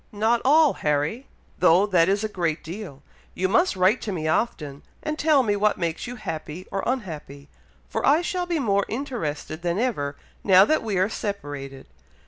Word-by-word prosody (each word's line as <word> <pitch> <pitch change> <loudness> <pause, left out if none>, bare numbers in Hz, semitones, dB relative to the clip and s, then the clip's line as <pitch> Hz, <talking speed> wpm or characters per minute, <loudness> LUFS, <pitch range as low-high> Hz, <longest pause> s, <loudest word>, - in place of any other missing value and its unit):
"Not 220 +3 +1
all, 300 +2 +5
Harry! 150 - -1 0.3
though 180 +2 +5
that 180 -4 +3
is 200 +2 +1
a - - 0
great 170 -6 -2
deal; 165 -5 -8 0.3
you 185 - 0
must 230 - +2
write 190 +6 +3
to 210 - -4
me 160 -4 -3
often, 150 -6 -1 0.2
and 305 - -2
tell 295 -3 +4
me 205 -3 +1
what 210 +1 +1
makes 170 +3 -3
you 245 - -6
happy 165 -4 -6
or 195 - -1
unhappy, 155 - -5 0.4
for - - -3
I 305 +5 +4
shall 355 0 -2
be 345 -2 0
more 200 -8 +1
interested 215 - -4
than 175 0 -1
ever, 175 - -1 0.3
now 190 -1 +7
that 310 - +2
we 210 -4 -2
are 185 +1 +3
separated. 145 -11 -6
195 Hz, 180 wpm, -24 LUFS, 160-235 Hz, 0.4 s, now